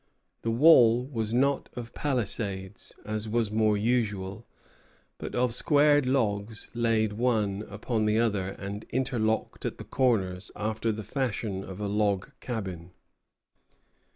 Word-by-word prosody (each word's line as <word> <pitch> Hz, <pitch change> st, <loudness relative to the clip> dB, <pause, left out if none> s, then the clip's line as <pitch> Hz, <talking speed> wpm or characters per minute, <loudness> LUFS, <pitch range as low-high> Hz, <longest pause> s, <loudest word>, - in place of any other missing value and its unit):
The 115 Hz, -, -2 dB
wall 120 Hz, -2 st, +6 dB
was 115 Hz, -5 st, -3 dB
not 135 Hz, +4 st, +1 dB
of 115 Hz, -1 st, -7 dB
palisades, 105 Hz, -8 st, -3 dB
as 110 Hz, 0 st, -3 dB
was 115 Hz, -1 st, 0 dB
more 110 Hz, -1 st, +3 dB
usual, 105 Hz, -2 st, -1 dB, 0.7 s
but -, -, -6 dB
of 125 Hz, -1 st, +1 dB
squared 145 Hz, +1 st, +4 dB
logs 110 Hz, -4 st, -1 dB
laid 115 Hz, -2 st, +1 dB
one 105 Hz, -3 st, 0 dB
upon 110 Hz, +2 st, -1 dB
another, 105 Hz, -4 st, +1 dB
and 100 Hz, +2 st, -6 dB
interlocked 115 Hz, -4 st, -1 dB
at -, -, -3 dB
the -, -, -7 dB
corners 100 Hz, -8 st, 0 dB
after 110 Hz, +2 st, -1 dB
the 110 Hz, 0 st, -5 dB
fashion 110 Hz, -6 st, -2 dB
of 95 Hz, 0 st, -8 dB
a 105 Hz, -, -2 dB
log 100 Hz, -2 st, 0 dB
cabin. 95 Hz, -8 st, -5 dB
110 Hz, 125 wpm, -28 LUFS, 100-120 Hz, 0.7 s, wall